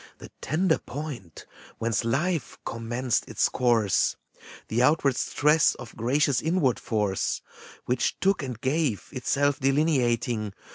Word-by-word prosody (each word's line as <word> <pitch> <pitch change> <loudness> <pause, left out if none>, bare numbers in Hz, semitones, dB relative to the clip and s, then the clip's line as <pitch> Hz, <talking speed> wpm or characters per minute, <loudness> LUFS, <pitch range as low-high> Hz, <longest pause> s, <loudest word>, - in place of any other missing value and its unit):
The - - -12
tender 160 +2 +1
point, 130 - -8 0.3
whence 115 0 0
Life 155 +6 -1
commenced 120 +2 -2
its - - +2
course, 115 -6 +2 0.5
The 115 +2 0
outward 140 0 +3
stress 150 +4 +3
of 120 -3 -11
gracious 135 +4 +1
inward 160 -6 +1
force, 105 -4 -1 0.4
Which 125 - 0
took 195 0 +2
and 125 -5 -5
gave, 135 -4 -1
itself 145 +2 0
delineating. 125 -7 +1
130 Hz, 115 wpm, -26 LUFS, 115-150 Hz, 0.5 s, outward